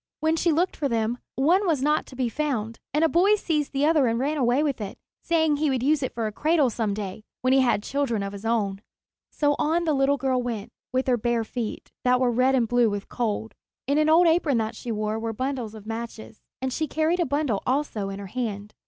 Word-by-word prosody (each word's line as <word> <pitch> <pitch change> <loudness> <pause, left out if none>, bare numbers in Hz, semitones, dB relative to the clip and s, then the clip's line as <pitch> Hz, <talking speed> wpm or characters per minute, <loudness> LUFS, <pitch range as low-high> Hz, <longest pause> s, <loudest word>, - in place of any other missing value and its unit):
When 315 +1 +2
she 335 +1 +2
looked 345 +5 +1
for 285 -3 -1
them, 230 +1 0 0.2
one 350 +9 +3
was 300 -6 +1
not 300 +1 +1
to 260 - -12
be 255 -1 0
found, 230 -5 -2
and 300 +3 +1
a - - +6
boy 370 +6 +4
seized 305 -8 -1
the 275 +1 +1
other 305 -4 +4
and 230 0 +1
ran 280 +5 0
away 255 +2 +2
with 280 -6 -1
it, 200 -1 -6 0.2
saying 320 -3 +2
he 305 0 +1
would 260 -2 0
use 295 +1 +3
it 260 - -3
for 230 -1 -1
a 215 - -2
cradle 300 +2 +2
some 215 -3 -1
day, 205 0 -6 0.2
when 255 +1 +3
he 270 - +5
had 240 -5 +2
children 250 -7 -1
of 200 0 -5
his 200 +1 -8
own. 205 -4 0 0.5
So 290 -1 +1
on 330 +3 +1
the 315 -2 +1
little 275 +1 +2
girl 260 -1 0
went 230 -2 -4 0.2
with 255 +1 0
her 250 -2 +2
bare 235 0 0
feet, 225 0 -5
that 250 0 +3
were 250 -1 +2
red 255 +3 +3
and 240 -3 +2
blue 245 -1 +3
with 205 -1 -5
cold. 225 -2 -2 0.3
In 280 +3 +2
an 305 0 +3
old 335 +3 +6
apron 325 -5 +3
that 220 0 -2
she 240 - -5
wore 215 0 -2
were 225 0 -3
bundles 255 -2 -3
of 215 -1 -11
matches, 225 -1 -7 0.2
and 260 -1 -1
she 315 +2 -1
carried 320 +4 0
a 345 - +2
bundle 285 -6 0
also 255 -7 -1
in 195 - -5
her 200 - -7
hand. 210 -1 -4
255 Hz, 240 wpm, -25 LUFS, 225-300 Hz, 0.5 s, a